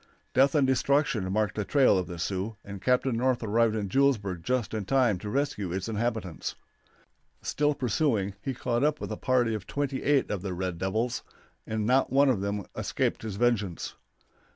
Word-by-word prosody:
Death 135 Hz, +2 st, +4 dB
and 145 Hz, -3 st, +4 dB
destruction 130 Hz, -6 st, +1 dB
marked 105 Hz, +1 st, +1 dB
the 105 Hz, -, -2 dB
trail 130 Hz, +3 st, +4 dB
of 90 Hz, -1 st, 0 dB
the 85 Hz, -, -6 dB
Sioux, 95 Hz, +5 st, -3 dB
and 100 Hz, -2 st, -8 dB
Captain 125 Hz, 0 st, +2 dB
North 125 Hz, +1 st, +1 dB
arrived 110 Hz, +1 st, +2 dB
at 105 Hz, -2 st, -2 dB
Julesburg 105 Hz, -7 st, +1 dB
just 125 Hz, +1 st, -1 dB
in 110 Hz, -2 st, -2 dB
time 120 Hz, -4 st, +2 dB
to 105 Hz, -, -6 dB
rescue 110 Hz, -7 st, -1 dB
its 95 Hz, +3 st, -3 dB
inhabitants. 110 Hz, -5 st, -2 dB, 0.9 s
Still 150 Hz, 0 st, +1 dB
pursuing, 115 Hz, -6 st, 0 dB
he 130 Hz, +3 st, -3 dB
caught 120 Hz, +1 st, -1 dB
up 150 Hz, 0 st, +2 dB
with -, -, -5 dB
a -, -, -2 dB
party 125 Hz, -3 st, +1 dB
of 105 Hz, -4 st, -5 dB
twenty 140 Hz, -2 st, -2 dB
eight 145 Hz, -2 st, +2 dB
of 100 Hz, -4 st, -2 dB
the 95 Hz, -2 st, -4 dB
red 90 Hz, -1 st, -3 dB
devils, 110 Hz, +6 st, -1 dB, 0.5 s
and 110 Hz, -1 st, -1 dB
not 130 Hz, +4 st, +3 dB
one 140 Hz, +1 st, +5 dB
of 115 Hz, -7 st, +1 dB
them 100 Hz, 0 st, -2 dB
escaped -, -, -1 dB
his 110 Hz, -3 st, -5 dB
vengeance. 105 Hz, -6 st, 0 dB
115 Hz, 185 wpm, -28 LUFS, 100-130 Hz, 0.9 s, one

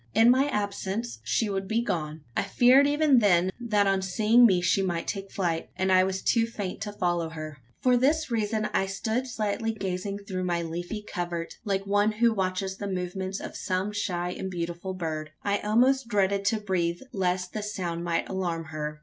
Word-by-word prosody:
In 230 Hz, +2 st, +7 dB
my 265 Hz, +3 st, +3 dB
absence, 205 Hz, -1 st, -3 dB
she 225 Hz, -, +1 dB
would 195 Hz, -1 st, -2 dB
be 225 Hz, +3 st, +1 dB
gone? 155 Hz, -6 st, -3 dB
I -, -, +2 dB
feared 250 Hz, +7 st, +5 dB
even 290 Hz, -3 st, +4 dB
then, 185 Hz, -4 st, +3 dB
that 210 Hz, -4 st, +2 dB
on 195 Hz, -1 st, +2 dB
seeing 215 Hz, +6 st, +5 dB
me 185 Hz, -4 st, +3 dB
she 175 Hz, +2 st, +2 dB
might 175 Hz, -3 st, -1 dB
take 195 Hz, -2 st, -4 dB
flight: 170 Hz, -4 st, -1 dB
and 190 Hz, 0 st, 0 dB
I 185 Hz, 0 st, +6 dB
was 190 Hz, 0 st, -2 dB
too 230 Hz, -1 st, +3 dB
faint 205 Hz, -5 st, -5 dB
to 210 Hz, -, -3 dB
follow 175 Hz, -4 st, -1 dB
her. 155 Hz, -3 st, -7 dB, 0.2 s
For 250 Hz, -1 st, +5 dB
this 285 Hz, +3 st, +2 dB
reason, 215 Hz, -1 st, 0 dB
I 195 Hz, -, +1 dB
stood 220 Hz, +6 st, -2 dB
silently 225 Hz, -1 st, -2 dB
gazing 195 Hz, -1 st, -3 dB
through 185 Hz, -2 st, -2 dB
my 170 Hz, -1 st, 0 dB
leafy 175 Hz, +6 st, -5 dB
covert, 175 Hz, -4 st, -4 dB
like 195 Hz, -1 st, -1 dB
one 205 Hz, +2 st, +2 dB
who 230 Hz, +1 st, +3 dB
watches 190 Hz, -1 st, -2 dB
the 200 Hz, -, -4 dB
movements 190 Hz, +1 st, -3 dB
of -, -, -7 dB
some 185 Hz, +2 st, -1 dB
shy 180 Hz, -4 st, -2 dB
and 190 Hz, +1 st, -5 dB
beautiful 175 Hz, +1 st, -4 dB
bird. 155 Hz, -3 st, -4 dB
I 200 Hz, 0 st, +1 dB
almost 250 Hz, +4 st, +3 dB
dreaded 200 Hz, -2 st, +1 dB
to 220 Hz, +2 st, +2 dB
breathe 175 Hz, -4 st, -1 dB
lest 185 Hz, -2 st, -1 dB
the 215 Hz, -, -3 dB
sound 180 Hz, -5 st, -3 dB
might 170 Hz, -1 st, -1 dB
alarm 175 Hz, -4 st, -2 dB
her. 150 Hz, 0 st, -4 dB
195 Hz, 190 wpm, -27 LUFS, 180-215 Hz, 0.2 s, In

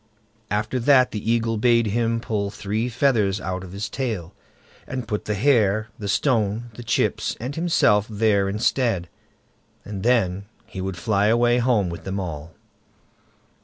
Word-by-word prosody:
After 105 Hz, +5 st, -1 dB
that 130 Hz, 0 st, +4 dB
the 110 Hz, +1 st, -2 dB
Eagle 115 Hz, -1 st, +1 dB
bade 115 Hz, +1 st, +3 dB
him 115 Hz, +2 st, 0 dB
pull 105 Hz, -3 st, -2 dB
three 110 Hz, +3 st, -3 dB
feathers 115 Hz, -6 st, +1 dB
out 95 Hz, -1 st, -4 dB
of 90 Hz, -, -10 dB
his 100 Hz, +3 st, -4 dB
tail, 110 Hz, -10 st, -4 dB, 0.5 s
and 130 Hz, -3 st, -5 dB
put 105 Hz, -, -3 dB
the 105 Hz, -, -1 dB
hare, 110 Hz, -3 st, +2 dB
the 105 Hz, -, -4 dB
stone, 115 Hz, -1 st, 0 dB
the 120 Hz, -, -9 dB
chips, 120 Hz, -, 0 dB
and 125 Hz, +5 st, -4 dB
himself 115 Hz, -, +3 dB
there 105 Hz, -2 st, +2 dB
instead, 105 Hz, -3 st, 0 dB, 0.8 s
and 100 Hz, -2 st, -6 dB
then 100 Hz, -5 st, +1 dB, 0.2 s
he 95 Hz, -, -7 dB
would 95 Hz, -1 st, -4 dB
fly 100 Hz, +3 st, +1 dB
away 120 Hz, +2 st, +3 dB
home 120 Hz, -6 st, +2 dB
with 85 Hz, -, -7 dB
them 95 Hz, +1 st, -3 dB
all. 80 Hz, -3 st, -6 dB
110 Hz, 155 wpm, -23 LUFS, 100-120 Hz, 0.8 s, that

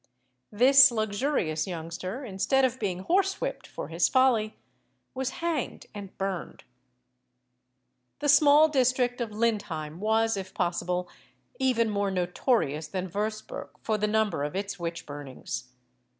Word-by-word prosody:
This 265 Hz, +5 st, +7 dB
luxurious 215 Hz, -, -1 dB
youngster, 180 Hz, -, -5 dB
instead 220 Hz, +6 st, +2 dB
of 255 Hz, 0 st, -2 dB
being 185 Hz, -3 st, -2 dB
horsewhipped 390 Hz, +7 st, 0 dB
for -, -, -7 dB
his 165 Hz, +2 st, +2 dB
folly, 245 Hz, -5 st, +2 dB, 0.6 s
was 265 Hz, 0 st, -2 dB, 0.2 s
hanged 320 Hz, -7 st, -2 dB
and 200 Hz, -2 st, -9 dB
burned. 190 Hz, -3 st, -4 dB, 1.5 s
The 290 Hz, -, -2 dB
small 290 Hz, +2 st, +7 dB
district 255 Hz, -3 st, +1 dB
of 235 Hz, -, -2 dB
Lindheim 200 Hz, -8 st, -2 dB
was, 220 Hz, +1 st, +1 dB
if 190 Hz, -1 st, -7 dB
possible, 180 Hz, 0 st, -1 dB, 0.5 s
even 250 Hz, -4 st, +2 dB
more 200 Hz, -1 st, 0 dB
notorious 180 Hz, -, 0 dB
than 185 Hz, 0 st, -4 dB
Würzburg 215 Hz, +2 st, -4 dB
for 215 Hz, -1 st, 0 dB
the 210 Hz, -, +1 dB
number 210 Hz, -8 st, +1 dB
of 145 Hz, +3 st, -4 dB
its 200 Hz, 0 st, -4 dB
witch 170 Hz, -1 st, -4 dB
burnings. 145 Hz, -3 st, -7 dB
210 Hz, 125 wpm, -27 LUFS, 180-255 Hz, 1.5 s, This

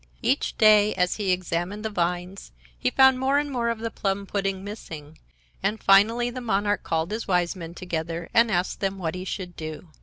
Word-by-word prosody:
Each -, -, 0 dB
day, 215 Hz, -1 st, +5 dB
as 180 Hz, -1 st, +1 dB
he 205 Hz, -3 st, -2 dB
examined 180 Hz, +3 st, -2 dB
the 220 Hz, -, -2 dB
vines, 180 Hz, -, -3 dB, 0.2 s
he -, -, 0 dB
found 265 Hz, -, +5 dB
more 270 Hz, +2 st, +2 dB
and 290 Hz, 0 st, -1 dB
more 240 Hz, -3 st, 0 dB
of 230 Hz, -, -1 dB
the 225 Hz, +1 st, -4 dB
plum 200 Hz, -1 st, -2 dB
pudding 195 Hz, -1 st, -2 dB
missing, 160 Hz, -7 st, -9 dB, 0.4 s
and 215 Hz, -, -1 dB
finally 225 Hz, +5 st, +4 dB
the 255 Hz, +1 st, -6 dB
monarch 205 Hz, -2 st, 0 dB
called 165 Hz, +3 st, -2 dB
his 220 Hz, +2 st, -4 dB
Wise 180 Hz, -1 st, +1 dB
Men 170 Hz, -2 st, -8 dB
together 170 Hz, -1 st, -4 dB
and 230 Hz, 0 st, +5 dB
asked 180 Hz, -2 st, -1 dB
them 195 Hz, -1 st, -2 dB
what 165 Hz, -4 st, -3 dB
he 185 Hz, 0 st, -6 dB
should 185 Hz, -2 st, -5 dB
do. 155 Hz, +2 st, -7 dB
195 Hz, 200 wpm, -25 LUFS, 175-220 Hz, 0.4 s, day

